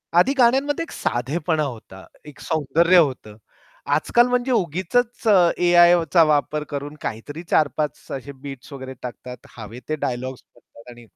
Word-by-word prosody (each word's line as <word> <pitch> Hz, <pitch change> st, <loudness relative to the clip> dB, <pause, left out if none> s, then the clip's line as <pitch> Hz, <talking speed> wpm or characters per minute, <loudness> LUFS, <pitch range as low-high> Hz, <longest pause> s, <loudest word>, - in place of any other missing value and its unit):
आधी 210 Hz, +11 st, +4 dB
गाण्यांमध्ये 270 Hz, +5 st, +2 dB
एक 330 Hz, -, -11 dB
साधेपणा 150 Hz, +6 st, -2 dB
होता. 110 Hz, -8 st, -8 dB, 0.2 s
एक 150 Hz, -, -13 dB
सौंदर्य 165 Hz, +4 st, +2 dB
होतं. 130 Hz, -10 st, +1 dB, 0.6 s
आजकाल 240 Hz, +10 st, +3 dB
म्हणजे 250 Hz, +1 st, 0 dB
उगीचच 225 Hz, +5 st, -1 dB
अ, 185 Hz, -5 st, +5 dB
ए-आयचा 175 Hz, -1 st, +5 dB
वापर 150 Hz, 0 st, 0 dB
करून 145 Hz, +1 st, -6 dB
काहीतरी 145 Hz, +9 st, -6 dB
4-5 150 Hz, 0 st, 0 dB
असे 135 Hz, +1 st, -6 dB
बीट्स 135 Hz, 0 st, -11 dB
वगैरे 130 Hz, -1 st, -8 dB
टाकतात 125 Hz, 0 st, -9 dB
हवे 115 Hz, +2 st, -9 dB
ते 155 Hz, -, 0 dB
डायलॉग्स 130 Hz, -2 st, -4 dB
म्हणतात 120 Hz, 0 st, -18 dB
आणि 120 Hz, 0 st, -14 dB
150 Hz, 140 wpm, -22 LUFS, 130-175 Hz, 0.6 s, अ